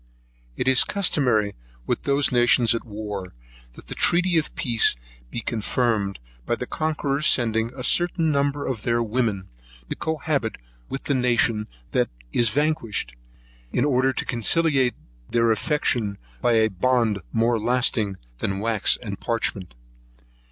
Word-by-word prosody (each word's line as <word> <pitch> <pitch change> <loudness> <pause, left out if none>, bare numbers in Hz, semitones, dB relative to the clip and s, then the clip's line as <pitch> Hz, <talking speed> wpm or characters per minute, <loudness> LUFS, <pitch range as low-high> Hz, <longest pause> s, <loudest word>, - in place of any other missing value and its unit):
It - - -2
is 130 -1 +6
customary 125 - +1 0.3
with - - -2
those 140 0 +2
nations 120 -1 +4
at 115 - -3
war, 105 - -6 0.4
that - - -14
the - - -7
treaty 175 0 +2
of 160 -2 0
peace 115 -3 +3 0.3
be 120 - -4
confirmed 110 -3 -1 0.3
by 120 - -1
the 125 - -5
conquerors 150 -1 -1
sending 115 -1 +2
a 130 - -6
certain 170 +2 +2
number 140 0 0
of 120 -5 -3
their 120 +1 +1
women 110 -5 -1 0.4
to - - -1
cohabit 150 -7 -2 0.3
with 135 - -5
the 140 - 0
nation 120 -4 +1 0.2
that - - +1 0.2
is 120 -2 +3
vanquished, 135 - -1 0.6
in 125 - +1
order 130 -2 +2
to - - -3
conciliate 130 +1 +2 0.3
their 115 -1 +2
affection 110 -4 0 0.2
by 120 - +3
a 110 -1 +3
bond 115 +1 +1
more 115 0 +2
lasting 115 -4 +1 0.2
than 95 - -2
wax 110 0 +1
and 100 -3 -6
parchment. 100 - -2
120 Hz, 140 wpm, -24 LUFS, 110-140 Hz, 0.6 s, is